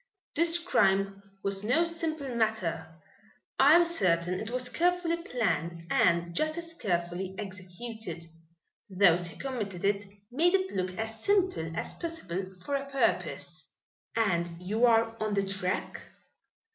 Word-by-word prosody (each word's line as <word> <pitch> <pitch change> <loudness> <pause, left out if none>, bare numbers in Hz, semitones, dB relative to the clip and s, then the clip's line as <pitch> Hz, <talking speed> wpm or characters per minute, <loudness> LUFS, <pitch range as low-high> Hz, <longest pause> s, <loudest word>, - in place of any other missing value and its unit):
"This 335 +2 +4
crime 195 - +2 0.2
was 195 0 -1
no 265 +10 +3
simple 315 -6 -3
matter. 215 -8 0 0.7
I 285 +4 +8
am 345 0 +6
certain 180 - +1
it 220 - -5
was 250 +1 -1
carefully 345 +3 +1
planned 175 - -2
and 170 -1 +3
just 310 - 0
as 335 -1 -5
carefully 180 - -2
executed. 195 0 -6 0.6
Those 180 -2 +4
who 170 - -7
committed 210 -10 -4
it 200 0 +1 0.3
made 340 +8 +3
it 380 0 0
look 185 -1 -2
as 220 0 -4
simple 370 - +1
as - - -3
possible 195 - -4
for 285 - -3
a 275 0 -1
purpose." 275 -1 -1 0.5
"And 180 -7 +1
you 215 +7 +2
are 225 -1 +3
on 215 -1 0
the 200 -1 +1
track?" 190 -1 -2
215 Hz, 135 wpm, -29 LUFS, 185-290 Hz, 0.7 s, I